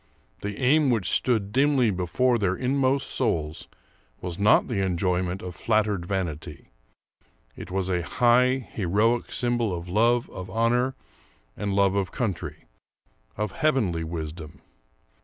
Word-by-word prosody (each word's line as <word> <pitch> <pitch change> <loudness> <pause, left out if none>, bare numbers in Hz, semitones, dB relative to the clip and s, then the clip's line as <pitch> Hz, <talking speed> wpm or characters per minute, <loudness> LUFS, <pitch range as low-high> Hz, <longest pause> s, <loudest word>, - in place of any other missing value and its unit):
The 100 0 -4
aim 140 +2 +4
which 110 -7 +1
stood 110 -5 +1
dimly 135 -2 +3
before 115 +7 +1
their 95 -3 +1
inmost 135 +1 +1
souls 80 - -2 0.5
was 90 0 -5
not 105 +1 +4
the 100 -5 -1
enjoyment 90 0 -1
of 90 -1 -6
flattered 105 -4 0
vanity; 90 -6 -4 0.8
it - - -9
was 95 0 -1
a 90 -2 0
high, 125 +5 +2
heroic 110 +5 +1
symbol 120 -3 0
of 85 0 -5
love 115 +5 +2
of 95 0 -8
honor 120 +5 +1 0.6
and 100 -2 -2
love 100 -1 +3
of 100 -4 -1
country, 110 -8 -4 0.7
of 105 -1 -2
heavenly 110 - 0
wisdom. 80 -1 -7
100 Hz, 130 wpm, -25 LUFS, 90-120 Hz, 0.8 s, aim